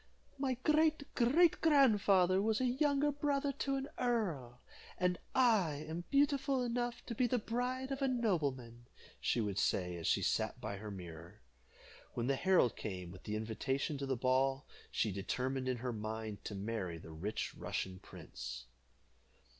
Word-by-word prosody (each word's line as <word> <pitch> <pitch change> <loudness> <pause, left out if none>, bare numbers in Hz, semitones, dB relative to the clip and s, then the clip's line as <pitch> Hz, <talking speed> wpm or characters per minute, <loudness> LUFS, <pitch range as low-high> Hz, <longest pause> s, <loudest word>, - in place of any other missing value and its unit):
"My 265 -2 0
great 305 -1 +2
great 305 +8 +4
grandfather 205 - +5
was 220 +1 +1
younger 280 +3 +2
brother 285 0 0
to 275 0 0
an 270 0 -2
earl, 170 - -1 0.4
and 180 -1 +1 0.2
I 195 - +3
am 170 +2 -5
beautiful 280 -2 +2
enough 240 0 -2
to 235 - -4
be 245 +2 +2
the 250 - +1
bride 250 +4 -2
of 270 +1 -3
a 270 - +3
nobleman," 140 - -1 0.3
she 120 - +1
would 100 -3 -1
say, 90 -2 +1
as 85 - -3
she - - +2
sat - - 0
by 100 -2 -4
her 105 +2 -7
mirror. 85 -5 -9 0.7
When 120 - -1
the 135 +2 +2
herald 180 - +3
came 90 -4 -5
with 95 +1 -13
the 105 - -2
invitation 130 +7 -2
to 140 - -3
the 130 -2 0
ball, 135 +2 +2 0.2
she 110 - 0
determined 130 +7 -2
in 125 - 0
her 125 +1 -3
mind 110 -1 -5
to 105 - -4
marry 100 -4 -3
the 80 0 -11
rich 95 +8 -3
Russian 95 -1 -4
prince. 65 -6 -8
150 Hz, 160 wpm, -35 LUFS, -, 0.7 s, grandfather